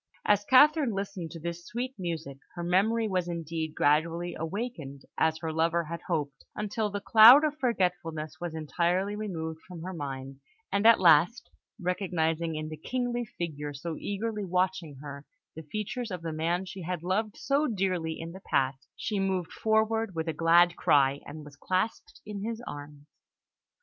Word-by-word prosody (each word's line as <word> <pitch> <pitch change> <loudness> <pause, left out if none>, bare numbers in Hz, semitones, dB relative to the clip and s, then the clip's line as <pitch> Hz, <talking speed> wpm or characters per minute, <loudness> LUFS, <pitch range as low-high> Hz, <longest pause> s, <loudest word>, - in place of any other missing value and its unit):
As 205 0 +3
Catherine 285 +1 +5
listened 195 -4 -4
to 165 - -9
this 170 +1 -5
sweet 245 +6 -4
music, 160 -6 -4 0.2
her 175 - -4
memory 215 +6 +2
was 185 -3 -1
indeed 165 -2 -4
gradually 165 +4 +1
awakened, 165 - -5
as 160 0 +2
her 160 -1 -2
lover 165 +1 +1
had 170 +1 -6
hoped, 145 -5 -2
until 210 +1 -2
the 205 0 -3
cloud 230 +7 +9
of 300 0 -1
forgetfulness 180 - -1
was 175 -2 -4
entirely 175 +5 0
removed 165 -7 -4
from 175 -3 -9
her 185 +1 -5
mind; 135 -3 -6 0.3
and 200 +2 +3
at 230 - +7
last, 175 +6 +4 0.3
recognising 170 -3 -1
in 155 0 -4
the 155 - -7
kingly 245 - -2
figure 150 -4 -4
so 160 +4 -5
eagerly 210 +1 -3
watching 180 -4 -1
her, 140 -1 -8 0.3
the 160 - -7
features 220 +3 -3
of 180 -3 -6
the 165 -1 -3
man 170 +4 -1
she 190 0 -8
had 175 -1 -4
loved 205 +4 -1
so 285 +2 +1
dearly 185 -7 -1
in 165 +1 -6
the 190 +2 -11
past, 135 0 0
she 210 -3 -2
moved 190 -3 -1
forward 220 -2 +1
with 160 0 -2
a 160 - -1
glad 170 +2 +5
cry, 140 0 +3
and 150 +1 -8
was 145 -1 -12
clasped 185 +8 -2
in 205 -2 -6
his 225 +1 -3
arms. 145 0 -9
175 Hz, 170 wpm, -29 LUFS, 160-205 Hz, 0.3 s, cloud